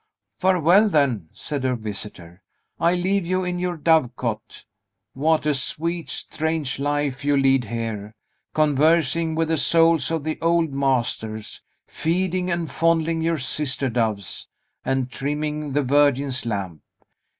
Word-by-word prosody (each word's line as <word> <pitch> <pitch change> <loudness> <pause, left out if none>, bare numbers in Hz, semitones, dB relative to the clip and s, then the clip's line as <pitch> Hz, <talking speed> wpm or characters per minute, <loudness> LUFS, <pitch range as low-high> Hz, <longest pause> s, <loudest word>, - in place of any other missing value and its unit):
"Farewell, 185 +3 +4
then," 130 - +1
said 145 -3 -5
her 130 -1 +1
visitor. 100 -5 -8 0.4
"I 170 +2 +3
leave 190 +2 +1
you 185 +2 0
in 180 0 -2
your 180 -1 -2
dove 155 -6 +3
cote. 110 -4 -5 0.5
What 155 +3 +1
a 150 - +3
sweet, 165 +5 -2
strange 155 -4 -2
life 145 -1 -1
you 145 0 +2
lead 135 -2 +3
here; 110 -1 -5 0.4
conversing 155 +2 +2
with 165 0 0
the 160 - +2
souls 165 -2 +4
of 165 -2 -2
the 155 +1 -3
old 165 -3 +2
masters, 120 -5 -1 0.2
feeding 180 +2 -1
and 170 -4 -2
fondling 165 0 +1
your 165 0 +1
sister 135 -1 -1
doves, 110 -7 -2 0.4
and 130 -1 0
trimming 150 +1 -3
the 145 +1 +2
Virgin's 140 -2 +2
lamp! 95 -8 -3
145 Hz, 135 wpm, -23 LUFS, 125-165 Hz, 0.5 s, Farewell